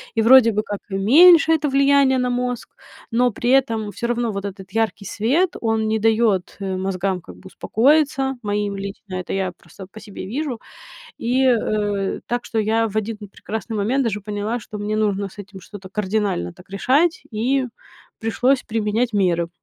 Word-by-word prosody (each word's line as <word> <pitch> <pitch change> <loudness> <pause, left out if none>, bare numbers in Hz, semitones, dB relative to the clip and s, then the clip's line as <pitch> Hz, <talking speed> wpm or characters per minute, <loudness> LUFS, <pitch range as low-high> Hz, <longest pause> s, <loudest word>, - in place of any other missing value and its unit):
И 225 - +2
вроде 235 0 +7
бы 215 +1 -1
как 205 -1 -5
и 195 - -4
меньше 320 - +6
это 300 -2 0
влияние 275 -1 +4
на 250 0 0
мозг, 245 -1 -2 0.4
но 245 +1 +2
при 240 +4 -3
этом 225 -6 +1
всё 235 - -4
равно 240 -1 -1
вот 200 0 -5
этот 190 -1 -8
яркий 220 -2 -1
свет- 285 - +1
он 225 -1 0
не 220 0 0
дает, 220 -4 +1
э, 190 -1 -3
мозгам, 190 -1 -2
как - - -13
бы, 190 - -14
успокоиться, 270 - +1
моим 205 -1 -2
лично. 195 -1 -7
Это 185 -1 -4
я 190 -2 -1
просто 190 -2 -13
по 220 +2 -13
себе 205 -2 -9
вижу, 255 +3 -4 0.6
и, 255 +3 +1
э, 210 -5 0
так 240 0 -2
что 225 - -2
я 225 +1 +1
в 215 - -10
один 215 0 -2
прекрасный 220 +1 -6
момент 230 +7 +1
даже 210 -4 -2
поняла, 210 +3 -3
что 210 -1 -9
мне 210 +1 -2
нужно 205 -2 0
с 190 - -19
этим 195 -1 -10
что-то 195 -3 -11
кардинально 200 - -2
так 180 - -18
решать, 275 - +1
и 255 +5 0 0.5
пришлось 250 +4 +1
применять 225 +2 -1
меры. 175 -4 +1
220 Hz, 180 wpm, -21 LUFS, 200-245 Hz, 0.6 s, вроде